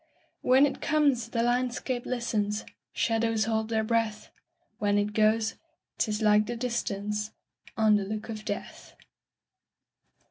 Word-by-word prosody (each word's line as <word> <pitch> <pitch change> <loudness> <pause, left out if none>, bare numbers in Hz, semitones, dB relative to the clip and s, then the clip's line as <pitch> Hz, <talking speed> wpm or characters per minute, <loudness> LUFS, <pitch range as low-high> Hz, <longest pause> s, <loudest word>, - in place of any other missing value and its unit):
When 260 +3 +5
it 285 - -3
comes, 285 -7 +2
the 230 0 0
landscape 245 +1 -1
listens, 220 -4 -1 0.3
Shadows 225 -2 +1
hold 220 0 -1
their 220 -1 +1
breath; 220 -1 -1 0.5
When 205 0 +2
it 205 +1 0
goes, 215 +1 +3 0.5
't - - +1
is 210 +1 -1
like 210 0 +4
the 240 0 -3
distanceOn 210 -3 -2 0.7
the 205 - -1
look 215 +2 -5
of 215 -2 -6
death. 205 - -6
220 Hz, 130 wpm, -28 LUFS, 210-240 Hz, 0.7 s, When